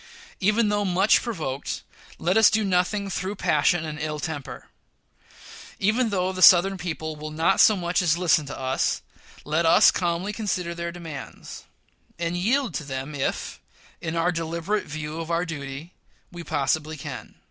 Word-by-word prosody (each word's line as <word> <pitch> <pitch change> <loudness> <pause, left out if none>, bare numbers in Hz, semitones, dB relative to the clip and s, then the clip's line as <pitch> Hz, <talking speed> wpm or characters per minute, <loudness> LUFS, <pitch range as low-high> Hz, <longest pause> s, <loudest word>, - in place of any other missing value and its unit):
Even 210 +2 +2
though 205 0 +1
much 190 +2 +3
provoked, 155 - -4 0.3
let 180 +2 0
us 220 -1 +7
do 215 0 +1
nothing 195 +2 +1
through 195 +1 -3
passion 155 -1 +2
and 150 -1 -6
ill 150 0 -3
temper. 145 -2 -6 1.1
Even 225 +4 +1
though 185 -2 0
the 185 -1 -6
Southern 185 +2 +7
people 160 -3 -5
will 155 +1 -7
not 155 +2 +1
so 215 - +7
much 175 +1 0
as 170 -2 +2
listen 165 -4 +2
to - - -7
us, 130 0 -1 0.4
let 155 +3 +1
us 165 - +6
calmly 175 +3 -1
consider 185 -5 -2
their 170 0 -4
demands, 165 -5 -9 0.5
and 170 +1 -2
yield 230 - +1
to 150 - -3
them 135 +1 -5
if, 140 -2 -3 0.4
in 165 0 -3
our 165 +2 +2
deliberate 170 +5 -2
view 155 +1 -6
of 165 0 -5
our 170 +1 0
duty, 145 0 -7 0.4
we 175 -1 -8
possibly 155 +1 -1
can. 135 - -8
170 Hz, 160 wpm, -25 LUFS, 155-190 Hz, 1.1 s, us